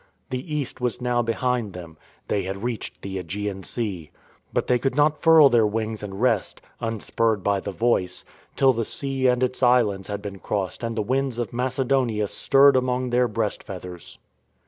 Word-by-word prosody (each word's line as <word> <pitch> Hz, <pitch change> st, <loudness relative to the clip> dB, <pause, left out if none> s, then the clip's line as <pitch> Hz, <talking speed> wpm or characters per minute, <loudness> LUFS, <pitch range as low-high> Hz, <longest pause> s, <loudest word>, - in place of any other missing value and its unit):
The 130 Hz, +5 st, -4 dB
East 140 Hz, -3 st, -3 dB
was 125 Hz, -2 st, -1 dB
now 125 Hz, -1 st, +1 dB
behind 120 Hz, -2 st, -1 dB
them. 85 Hz, -3 st, -9 dB, 0.3 s
They 100 Hz, -, 0 dB
had 95 Hz, +2 st, -5 dB
reached 120 Hz, -2 st, -4 dB
the 95 Hz, -1 st, -4 dB
^gean 100 Hz, +2 st, -4 dB
Sea. 95 Hz, -8 st, -4 dB, 0.4 s
But -, -, 0 dB
they 125 Hz, -1 st, +2 dB
could 135 Hz, +1 st, -1 dB
not 150 Hz, +1 st, +3 dB
furl 160 Hz, -3 st, +8 dB
their 115 Hz, -4 st, +4 dB
wings 110 Hz, 0 st, -3 dB
and 100 Hz, -2 st, -6 dB
rest, 115 Hz, -5 st, +1 dB, 0.2 s
unspurred 115 Hz, -2 st, -1 dB
by 100 Hz, -1 st, +2 dB
the 100 Hz, -, -5 dB
Voice, 105 Hz, -3 st, 0 dB, 0.3 s
till 135 Hz, -1 st, +4 dB
the 115 Hz, -1 st, -1 dB
sea 135 Hz, +2 st, -1 dB
and 125 Hz, 0 st, +2 dB
its 130 Hz, 0 st, -1 dB
islands 115 Hz, -6 st, +3 dB
had 100 Hz, 0 st, -5 dB
been 100 Hz, -2 st, -6 dB
crossed 95 Hz, +2 st, -3 dB
and 115 Hz, -1 st, -2 dB
the 110 Hz, -, 0 dB
winds 130 Hz, +2 st, -1 dB
of 120 Hz, -4 st, -3 dB
Macedonia 125 Hz, -3 st, 0 dB
stirred 140 Hz, +6 st, +4 dB
among 125 Hz, 0 st, 0 dB
their 125 Hz, 0 st, +3 dB
breast 110 Hz, -1 st, -2 dB
feath 90 Hz, -2 st, -8 dB
ers. 90 Hz, -1 st, -10 dB
115 Hz, 185 wpm, -24 LUFS, 100-125 Hz, 0.4 s, furl